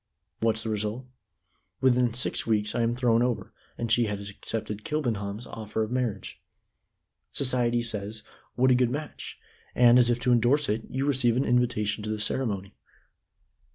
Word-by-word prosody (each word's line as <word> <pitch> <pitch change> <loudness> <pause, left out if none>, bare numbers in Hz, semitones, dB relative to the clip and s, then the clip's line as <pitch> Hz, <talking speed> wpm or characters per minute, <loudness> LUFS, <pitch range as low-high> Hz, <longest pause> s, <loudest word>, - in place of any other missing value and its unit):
What's 110 -1 +1
the 115 - -3
result? 110 +4 -2 0.7
Within 125 -2 +3
six 125 - +1
weeks 105 -2 +1
I 120 - 0
am 115 +1 +1
thrown 120 -2 +2
over, 125 -1 -1 0.2
and 115 -1 -3
she 120 0 +4
has 100 -1 -4
accepted 105 0 -5
Kilbenham's 115 -8 -2
offer 110 -1 -4
of 110 - -5
marriage. 120 -6 -3 0.9
Society 120 -3 +1
says 110 -1 -3 0.3
'What 130 +1 +4
a - - +7
good 125 -1 +3
match!' 145 +4 -6 0.4
and, 120 0 +6
as 120 -1 +4
if 120 0 +1
to 125 - +2
endorse 125 +5 +3
it, 110 +2 -1
you 135 +1 -2
receive 125 -4 +2
an 135 - +1
invitation 115 -4 +1
to 110 - -4
the 110 - -1
ceremony." 105 -3 -1
120 Hz, 160 wpm, -27 LUFS, 110-125 Hz, 0.9 s, a